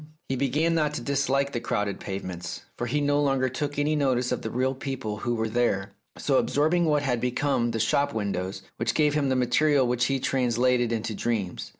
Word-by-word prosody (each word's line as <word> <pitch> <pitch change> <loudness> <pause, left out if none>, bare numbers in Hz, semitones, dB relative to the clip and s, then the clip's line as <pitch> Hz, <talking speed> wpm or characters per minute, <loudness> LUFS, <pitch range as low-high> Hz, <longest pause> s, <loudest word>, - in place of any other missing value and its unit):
He 135 - 0
began 145 +6 +1
not 150 -2 +1
to - - -3
dislike 140 +1 0
the 120 - -2
crowded 105 -4 -2
pavements, 90 -3 -5
for 120 - -3
he 150 +5 0
no 145 0 +2
longer 135 -2 +2
took 145 +3 -3
any 150 +1 +1
notice 130 -4 +1
of - - -1
the 110 - -4
real 130 +3 0
people 130 -5 -4
who 120 +2 -1
were 110 0 -1
there, 110 -4 0 0.3
so - - +2
absorbing 160 +4 +2
had 125 -4 0
become 125 -1 +1
the 115 -1 -2
shop 140 +6 +2
windows 95 -3 -3
which 115 0 -1
gave 150 -2 +3
him 145 -2 +1
the 130 - +2
material 130 +3 +3
which 125 0 +1
he 135 +1 0
translated 125 -2 +1
into 110 -1 -2
dreams. 105 -5 -2
125 Hz, 200 wpm, -26 LUFS, 115-140 Hz, 0.3 s, gave